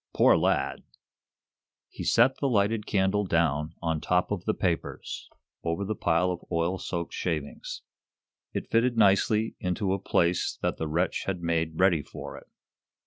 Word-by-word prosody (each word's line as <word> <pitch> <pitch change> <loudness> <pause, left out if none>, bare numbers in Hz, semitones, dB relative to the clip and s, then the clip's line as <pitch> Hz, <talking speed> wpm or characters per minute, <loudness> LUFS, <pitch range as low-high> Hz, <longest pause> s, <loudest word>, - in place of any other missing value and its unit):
Poor - - +6
lad!" - - +1 1.1
He - - -8
set 130 +3 +4
the 140 - +1
lighted 105 -1 +1
candle 100 +1 +2
down 80 -3 0
on 80 -2 0
top 90 +2 +1
of 95 -3 -3
the 110 - +1
papers, 90 -4 -3 0.3
over 85 +4 -1
the 110 - -1
pile 90 -2 +1
of 90 - -5
oil 85 +3 0
soaked 85 -1 -4
shavings. - - -4 0.7
It - - -5
fitted 120 +1 +2
nicely 105 +2 +3
into 95 +1 -1
a 100 - -1
place 90 -2 +1
that - - 0
the 80 - -2
wretch 85 +3 0
had 90 -3 -3
made 80 -1 -1
ready 90 -4 +4
for - - -9
it. - - -12
90 Hz, 155 wpm, -28 LUFS, 85-105 Hz, 1.1 s, Poor